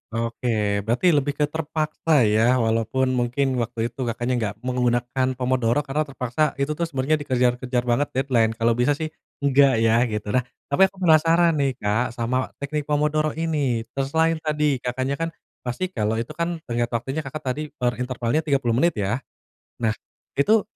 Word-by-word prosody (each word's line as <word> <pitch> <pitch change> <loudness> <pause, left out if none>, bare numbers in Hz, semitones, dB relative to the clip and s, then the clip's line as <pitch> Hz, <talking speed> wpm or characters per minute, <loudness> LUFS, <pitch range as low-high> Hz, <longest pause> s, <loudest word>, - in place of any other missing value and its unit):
Oke, 115 -3 0
berarti 130 +10 +3
lebih 145 -1 +1
ke 150 - +1
terpaksa 155 -2 +1
ya, 110 +4 +4
walaupun 115 +4 +1
mungkin 125 +1 0
waktu 115 +1 -2
itu 125 0 -4
Kakaknya 120 +2 -1
nggak 105 -2 -2
menggunakan 125 0 0
pomodoro 125 +1 +1
karena 150 +2 -1
terpaksa, 135 +3 -1
itu 140 +2 -1
tuh 170 +2 -1
sebenarnya 145 +1 0
dikejar-kejar 125 -2 0
banget 125 +4 +1
deadline. 120 -4 +2
Kalau 115 +1 +2
bisa 125 +5 +2
sih 155 +1 -4 0.3
enggak 140 -1 +5
ya 115 +1 +4
gitu. 105 -1 -3
Nah, 125 - +3 0.3
tapi 190 +7 +5
aku 190 -1 -10
penasaran 165 0 +4
nih, 135 -2 +1
Kak, 115 +1 -1
sama 125 +2 -1
teknik 145 +1 -4
pomodoro 150 +1 +1
ini. 145 -8 0
Terus 135 0 -2
selain 165 0 +3
tadi, 150 -4 0
Kakaknya 130 +3 -2
kan 165 - 0 0.3
pasti 155 +10 -3
kalau 110 - -1
itu 115 +6 -3
kan 170 +2 -2
tenggat 120 -1 -1
waktunya 125 +6 -3
Kakak 150 +1 -6
tadi 150 +3 -4
per 120 -3 -1
intervalnya 125 +2 -1
30 135 -6 +1
menit 170 -1 +3
ya? 105 +4 -1 0.6
Nah 110 -1 +1 0.4
itu, 215 +10 +4
130 Hz, 170 wpm, -23 LUFS, 120-150 Hz, 0.6 s, enggak